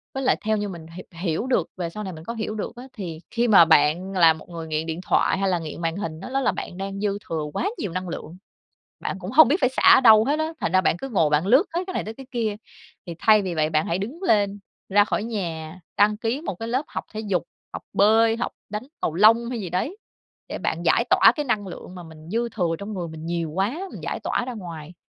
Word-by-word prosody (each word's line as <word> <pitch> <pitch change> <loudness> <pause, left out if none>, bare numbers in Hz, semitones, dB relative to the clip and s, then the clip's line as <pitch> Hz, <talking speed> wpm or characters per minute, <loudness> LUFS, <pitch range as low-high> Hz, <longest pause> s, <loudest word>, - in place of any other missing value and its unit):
Với 270 - -2
lại - - +3
theo 215 0 +2
như 205 0 -2
mình 170 -4 -8
hi 170 +3 -10 0.2
hiểu 175 +6 -1
được 225 -10 +1
về 175 -2 -3
sau 210 +5 -7
này 190 -2 -5
mình 160 0 -10
có 235 - -4
hiểu 220 -1 -4
được 215 - -5
á, 245 - -9
thì 170 -7 -6
khi 240 0 +1
mà 195 -7 +8
bạn 160 +4 +3
là 165 -4 +6
một 160 - -13
người 165 -2 -7
nghiện 155 0 -2
điện 165 +1 -4
thoại - - +2
hay 195 0 +1
là 180 -2 +1
nghiện 160 0 -7
màn 165 -1 -1
hình 160 -6 -5
á, 195 - -7
đó 270 +1 0
là - - +2
bạn 175 - -7
đang 195 0 -5
dư 205 -1 0
thừa 160 -2 -2
quá 400 - -1
nhiều 200 - -3
năng 185 0 -3
lượng, 165 +1 -7 0.6
bạn - - -3
cũng 185 +1 -6
hông 270 +2 +7
biết 290 - +3
phải - - +4
xả 260 - -3
ở - - +6
đâu 220 -3 +7
hết 290 +5 0
á, 315 +1 -1
thành 165 - -1
ra 185 - +5
bạn 180 - +1
cứ 270 - -6
ngồi 165 - +2
bạn 150 +4 +2
lướt 260 - +5
hết 345 - +1
cái 370 - -6
này - - -1
tới 220 - -6
cái 265 +2 -11
kia. 225 -5 -1 0.5
Thì 170 - -6
thay 215 +1 +5
vì 185 -3 -3
vậy 155 -1 +1
bạn 155 0 +1
hãy 170 - -1
đứng 245 - -6
lên, 205 - +2 0.3
ra 205 +1 +5
khỏi 210 - -2
nhà, 175 -6 -5 0.2
đăng 210 +1 +4
ký 230 +5 -2
một 315 - -4
cái 225 +6 -6
lớp 260 +5 0
học - - -5
thể 215 - -3
dục, 200 -6 -1 0.3
học - - -6
bơi, 225 +3 +4
học 240 - -3 0.2
đánh 210 +3 -5 0.2
cầu 160 - -1
lông 230 +5 +5
hay 240 -3 -3
gì 185 -4 -5
đấy 230 - -2 0.5
để - - -5
bạn - - -2
giải - - +4
tỏa - - +7
cái 295 - -1
năng 215 -6 -1
lượng 180 0 -9
mà 180 - -8
mình 160 -1 -13
dư 235 +3 0
thừa 175 -7 -1
trong 200 +3 -6
người 175 -3 -4
mình 160 0 -8
nhiều 170 -2 -2
quá, 195 - -1
mình - - -8
giải - - -4
tỏa - - -1
ra 255 - -4
ngoài, 170 -5 -8
195 Hz, 275 wpm, -24 LUFS, 170-225 Hz, 0.6 s, mà